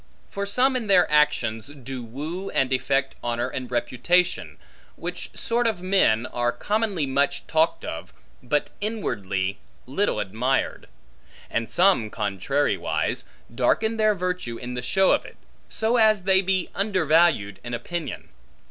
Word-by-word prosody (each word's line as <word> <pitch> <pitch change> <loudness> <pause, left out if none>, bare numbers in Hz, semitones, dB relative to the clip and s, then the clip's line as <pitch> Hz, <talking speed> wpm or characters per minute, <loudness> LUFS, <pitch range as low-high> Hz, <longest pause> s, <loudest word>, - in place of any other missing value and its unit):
For 200 0 -3
some 255 +6 +3
in 240 -4 -2
their 185 -3 +6
actions, 130 -7 +2
do 135 -3 -7
woo 155 +11 -5
and 135 0 +1
effect 135 +1 +1
honor 120 +1 -1
and 130 -1 -5
reputation, 125 +9 +1 0.4
which - - -6
sort 235 +1 +1
of 205 -6 -2
men, 185 - +3
are 120 -1 0
commonly 205 - -1
much 140 +1 0
talked 160 +1 +1
of, - - -6 0.3
but 145 +4 -1
inwardly 100 - -2 0.3
little 195 +11 0
admired. 125 +7 -1 0.6
And 115 0 -1
some, 180 - +3
contrariwise, 105 +8 -1 0.3
darken 220 - +1
their 215 -1 +3
virtue 180 -10 -3
in 125 +1 -6
the 125 - -3
show 190 +10 +3
of - - +2
it; - - -13 0.3
so 225 +2 +1
as 215 -4 +4
they 190 0 +5
be 190 -1 0
undervalued 165 - +2
in 120 0 -3
opinion. 165 +7 -5
150 Hz, 140 wpm, -24 LUFS, 120-195 Hz, 0.6 s, their